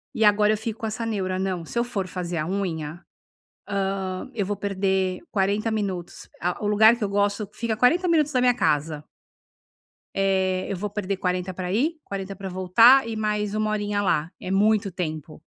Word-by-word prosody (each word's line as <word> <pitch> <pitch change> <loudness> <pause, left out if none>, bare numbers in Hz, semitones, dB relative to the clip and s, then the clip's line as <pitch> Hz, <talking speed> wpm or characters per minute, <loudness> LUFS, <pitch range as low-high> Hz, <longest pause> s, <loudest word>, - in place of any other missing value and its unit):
e 220 - +1
agora 210 0 +5
eu - - -1
fico 220 +1 -5
com 220 - -1
essa 230 +2 -4
neura: 190 -4 -2
"Não, 185 -3 -2
se 235 - -7
eu 235 - +3
for 205 -6 -3
fazer 175 -1 -4
a 155 - -1
unha, 175 -4 -3 1.0
hã, 185 -1 -5
eu 210 -4 -1
vou 205 +1 -2
perder 190 -2 0
40 205 +3 +1
minutos". 195 -5 -4
A 180 +4 -2
o - - +1
lugar 220 +2 +6
que 235 - -5
eu 205 - 0
gosto 205 +1 0
fica 225 0 -2
40 330 +10 +3
minutos 310 -3 +3
da 255 - +1
minha 250 0 +5
casa. 155 -3 0 1.1
Eh, 190 -1 +1
eu 195 - -1
vou 205 +3 -3
perder 200 -1 -2
40 180 0 -2
para 180 0 -4
ir, 305 - +1
40 195 0 -5
pra 195 +1 -6
voltar 225 +8 +5
e 225 - -4
mais 210 -1 -1
1 215 0 0
horinha 205 -1 -1
lá. 165 -5 +1
É - - -7
muito 200 0 +2
tempo! 155 -3 -5
200 Hz, 195 wpm, -24 LUFS, 185-215 Hz, 1.1 s, lugar